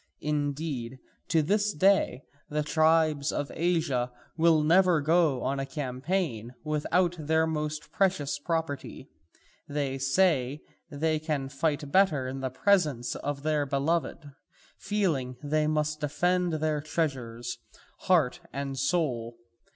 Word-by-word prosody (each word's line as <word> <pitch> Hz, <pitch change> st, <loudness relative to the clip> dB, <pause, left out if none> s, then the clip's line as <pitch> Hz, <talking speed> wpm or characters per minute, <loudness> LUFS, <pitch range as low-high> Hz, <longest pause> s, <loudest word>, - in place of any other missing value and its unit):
Indeed, 145 Hz, -4 st, -2 dB, 0.3 s
to 160 Hz, -2 st, +2 dB
this 205 Hz, +5 st, +1 dB
day 190 Hz, -5 st, +3 dB, 0.3 s
the 150 Hz, 0 st, -1 dB
tribes 155 Hz, -1 st, +2 dB
of 145 Hz, -, -3 dB
Asia 160 Hz, -8 st, 0 dB, 0.2 s
never 165 Hz, +2 st, +4 dB
go 155 Hz, -4 st, +2 dB
on 135 Hz, +1 st, -1 dB
a 135 Hz, -, -2 dB
campaign 135 Hz, -, -3 dB
without 165 Hz, +4 st, +1 dB
their 160 Hz, +1 st, +2 dB
most 155 Hz, -1 st, -3 dB
precious 180 Hz, -7 st, 0 dB
property: 160 Hz, -3 st, -4 dB, 0.6 s
they 140 Hz, -2 st, -2 dB
say 135 Hz, -1 st, +2 dB, 0.3 s
they 155 Hz, +2 st, 0 dB
can 150 Hz, -4 st, -2 dB
fight 145 Hz, 0 st, -1 dB
better 170 Hz, -8 st, +3 dB
in 135 Hz, +1 st, -5 dB
the 130 Hz, 0 st, -2 dB
presence 150 Hz, -, +1 dB
of 145 Hz, -1 st, -4 dB
their 150 Hz, -2 st, +1 dB
beloved, 145 Hz, +2 st, -1 dB, 0.5 s
feeling 155 Hz, -12 st, -1 dB
they 150 Hz, +1 st, +1 dB
must 155 Hz, 0 st, 0 dB
defend 175 Hz, +4 st, +1 dB
their 155 Hz, -1 st, 0 dB
treasures, 130 Hz, -7 st, -3 dB, 0.4 s
heart 170 Hz, -5 st, +2 dB
and 135 Hz, -1 st, -4 dB
soul. 130 Hz, -7 st, -1 dB
150 Hz, 120 wpm, -28 LUFS, 135-165 Hz, 0.6 s, never